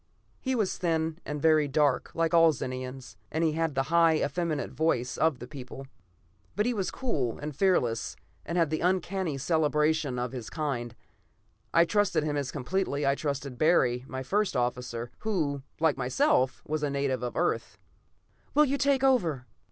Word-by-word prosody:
He 260 -1 -1
was 215 -5 -1
thin 165 -2 0
and 150 0 -3
very 155 -1 +4
dark, 140 -2 +1
like 165 0 +1
all 165 -1 +7
Zenians, 130 -4 -6
and 160 +2 0
had 160 -2 -1
the 135 - +2
high, 165 -1 +5
effeminate 155 0 -1
voice 125 -6 0
of 160 -4 +2
that 125 - -10
people. 135 -1 -8 0.7
But 210 - +1
he 245 - +1
was 195 -5 -1
cool 140 - -2
and 150 -1 -6
fearless 130 -11 +1 0.3
and 170 - -3
had 165 -3 +2
the 155 - 0
uncanny 180 -3 0
cerebration 150 -1 +1
of 125 0 -2
his 120 -4 -6
kind; 120 -2 -3 0.8
I 170 0 +5
trusted 205 -4 +1
him 150 -1 -1
as 140 -3 -2
completely 145 0 -1
as 140 - +4
I - - +2
trusted 140 -3 -4
Barry, 125 -7 +3
my 130 0 -5
first 200 +1 0
officer, 120 -1 -2
who, 155 -10 -1 0.2
like 160 -3 +2
myself, 130 0 +1
was 155 0 -2
a 150 - 0
native 140 -3 -1
of 125 -1 -4
Earth. 175 - -1 0.8
"Will 300 +1 +6
you 280 0 -1
take 275 -1 +2
over?" 170 - +2
150 Hz, 170 wpm, -28 LUFS, 130-170 Hz, 0.8 s, all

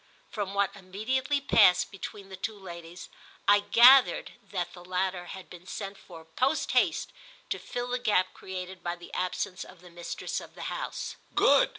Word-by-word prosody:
From 200 -2 -3
what 200 0 +1
immediately 250 +9 -1
passed 210 -9 +5
between 195 0 -8
the 190 - -7
two 205 +3 -4
ladies 175 -2 -9 0.4
I 205 0 +7
gathered 240 +6 +6
that 180 -3 -4
the 175 - -11
latter 185 0 -1
had 190 0 -9
been 180 +1 -13
sent 195 -1 -5
for 165 -4 -13
post 255 - 0
haste - - +2 0.4
to - - -1
fill 245 0 -4
the 250 0 -1
gap 205 -6 +2
created 185 0 -7
by 175 0 -2
the 175 0 -13
absence 180 0 -2
of 180 -2 -15
the 180 -1 -14
mistress 170 0 -4
of - - -13
the - - -7
house. - - -5 0.2
"Good!" - - +5
190 Hz, 175 wpm, -29 LUFS, 180-210 Hz, 0.4 s, I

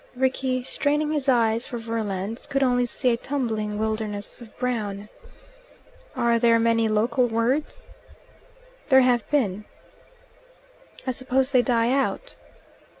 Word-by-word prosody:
Rickie, 260 0 0
straining 295 +3 0
his 290 -3 0
eyes 230 -2 +2
for 240 - -5
verlands, 225 -2 -4
could 275 0 0
only 245 -1 +2
see 250 +1 0
a 235 - +1
tumbling 225 -6 -2
wilderness 215 0 -3
of 225 -3 -14
brown. 210 -5 -3 1.1
"Are 235 -1 +2
there 230 -1 +4
many 230 0 +2
local 235 +4 +2
words?" 255 - -1 1.0
"There 265 -1 +7
have 245 -3 +2
been." 215 -9 0 1.4
"I 260 - 0
suppose 260 +1 0
they 255 - +5
die 240 -1 +1
out." 275 - -1
240 Hz, 125 wpm, -24 LUFS, 225-260 Hz, 1.4 s, There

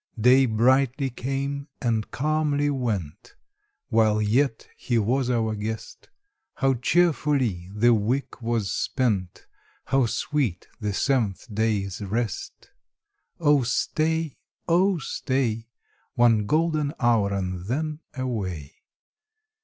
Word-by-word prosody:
Days 130 +3 +5
brightly 130 +4 +2
came 140 +3 -3
and 115 -3 -1
calmly 145 0 0
went, 105 - -3 0.5
While 110 -3 +3
yet 115 +4 +1
he 120 - -1
was 125 +4 +1
our 115 -3 +1
guest; 110 +1 -6 0.5
How 135 -1 +2
cheerfully 135 - +1
the 115 +4 +4
week 120 +6 -1
was 115 -4 -1
spent! 105 -9 -1 0.4
How 135 -3 +2
sweet 120 - -1
the 105 -3 -2
seventh 115 -8 0
day's 105 -3 -1
rest! 105 +1 -4 0.7
Oh 145 -4 +4
stay, 155 +5 0 0.3
oh 180 +2 +3
stay, 125 -5 -2 0.5
One 115 -4 +4
golden 155 0 +1
hour, 115 -5 +3
and 95 -2 -3
then 155 +5 -2 0.2
away. 95 - -4
120 Hz, 105 wpm, -25 LUFS, 105-140 Hz, 0.7 s, Days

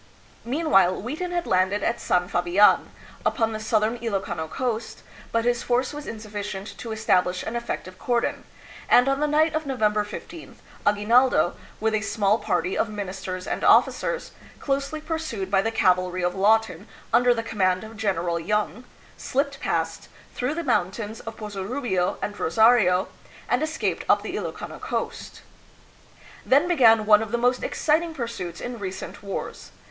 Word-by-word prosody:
Meanwhile, 240 - +3
Wheaton 305 - -4
had 350 -1 -2
landed 185 +2 +1
at 230 - -1
San 180 0 +1
Fabian, 175 +4 +3 0.3
upon 225 -5 +1
the 215 - -4
southern 220 +2 0
Ilokano 195 -8 -3
coast, 235 -3 -3 0.3
but 230 0 0
his 240 0 +1
force 250 +3 0
was 295 0 -7
insufficient 205 -2 -6
to 230 - -6
establish 185 -4 +1
an 220 - -5
effect 235 -5 -4
ive 185 0 -13
cordon, 240 -1 -1 0.5
and 245 +2 +6
on 275 0 +1
the 300 - +1
night 310 +2 +3
of 310 -1 -2
November 215 -5 +1
loth 335 +8 -9 0.3
Agui 205 0 +2
naldo, 245 -5 +4 0.3
with 220 0 0
a 215 - +1
small 215 0 +1
party 180 +1 -1
of 225 - 0
ministers 185 -3 -5
and - - -3
officers, - - +3 0.3
closely 280 +2 -2
pursued 310 - -4
by 195 -1 +4
the 225 - 0
cavalry 185 -4 +1
of 175 0 +1
Lawton 205 -1 +2 0.3
under 245 +1 +5
the 230 -1 0
command 185 -4 0
of 220 +1 -10
General 175 -5 -1
Young, 210 +6 -2 0.3
slipped 280 +1 -2
past, - - -2 0.3
through 250 +5 -2
the 340 - -3
mountains 215 - -1
of 225 0 -8
Pozorubio 205 -2 -2
and 205 0 -4
Rosario, 200 -1 +4 0.4
and 245 - +1
escaped 315 +1 -1
up - - +4
the - - -5
Ilokano - - -5
coast. - - -5 1.0
Then 285 +6 +4
began 230 -10 +5
one 210 0 +6
of 220 -2 -5
the 240 - +1
most 245 +1 +1
exciting 320 +1 0
pursuits 195 - -5
in 245 -1 -6
re 190 -2 -3
cent 190 - -8
wars. 200 -1 -6
220 Hz, 160 wpm, -24 LUFS, 195-250 Hz, 1.0 s, and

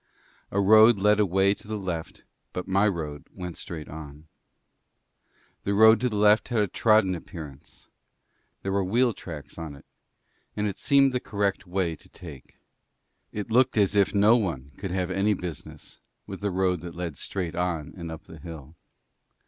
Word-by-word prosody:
A 100 - -1
road 110 +3 +7
led 105 +2 +3
away 95 0 +3
to 105 - -13
the 110 0 -3
left, 90 -5 -5 0.3
but 90 - -4
my 100 +2 +3
road 75 -7 -4
went 90 -2 -6
straight 80 -3 -7
on. 75 0 -10 1.4
The 100 - 0
road 110 +2 +7
to 125 - +1
the 105 - -4
left 105 +1 +4
had 120 - -2
a 105 - +2
trodden 105 -1 +3
appearance; 75 -5 -10 0.8
there 95 - -2
were 100 0 +1
wheel 120 +5 +2
tracks 75 -5 -9
on 80 -3 -6
it, 70 - -16 0.7
and 105 - 0
it 100 -3 -3
seemed 140 -1 +4
the 125 - +1
correct 100 -4 -2
way 90 -2 -1
to - - -20
take. 80 -8 -12 0.7
It 105 +1 -5
looked 125 0 +3
as 100 -1 +3
if 100 -1 +4
no 105 +3 +6
one 75 - -3
could 95 - -5
have 90 0 -2
any 100 +2 +2
business 90 -5 -8 0.3
with 95 0 -8
the 100 - 0
road 90 -2 0
that 85 -1 -8
led 85 -3 -4
straight 90 0 -4
on 85 -4 -2
and 85 -3 -7
up 80 0 -8
the 80 - -13
hill. 80 -1 -10
95 Hz, 175 wpm, -26 LUFS, 85-105 Hz, 1.4 s, road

